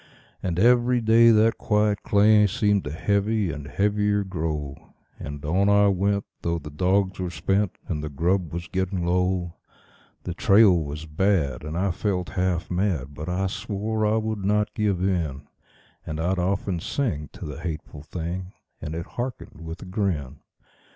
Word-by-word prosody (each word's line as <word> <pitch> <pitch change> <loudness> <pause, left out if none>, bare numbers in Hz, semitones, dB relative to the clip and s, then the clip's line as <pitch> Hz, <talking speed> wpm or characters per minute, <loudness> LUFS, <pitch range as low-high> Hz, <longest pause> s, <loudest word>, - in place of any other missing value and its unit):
And 85 -3 -2
every 120 +4 +4
day 115 +1 +6
that 110 0 +4
quiet 105 -1 +1
clay 105 +1 +5
seemed 105 -1 +1
to 75 - -4
heavy 100 +3 0
and 75 -2 -7
heavier 105 +3 +1
grow; 80 -6 -5 0.2
And 70 0 -7
on 95 +6 +2
I 100 0 +5
went, 100 +1 +1 0.2
though 85 0 -1
the 75 -2 -8
dogs 95 +5 +1
were 90 -1 -2
spent 95 +4 0
and 75 -4 -3
the 75 - -3
grub 85 +3 0
was 85 +1 -5
getting 95 -2 -2
low; 90 -1 0 0.7
The 90 - -4
trail 100 0 +5
was 75 -1 -3
bad, 80 -3 0
and 80 +2 -4
I 95 +1 +1
felt 95 -1 -2
half 90 -2 -1
mad, 90 -7 -1
but 75 +4 -6
I 90 +2 0
swore 105 +3 -2
I 110 +1 +2
would 110 -2 -2
not 105 +1 +1
give 100 -4 0
in; 80 -7 -1 0.6
And 80 0 -5
I'd 90 +3 0
often 95 0 -1
sing 80 - -2
to - - -8
the 75 -1 -7
hateful 80 -3 -6
thing, 90 +4 -5 0.3
and 75 +1 -5
it 85 +1 -4
hearkened 120 - -6
with 80 +1 -7
a - - -9
grin. 90 - -2
95 Hz, 165 wpm, -25 LUFS, 80-105 Hz, 0.7 s, day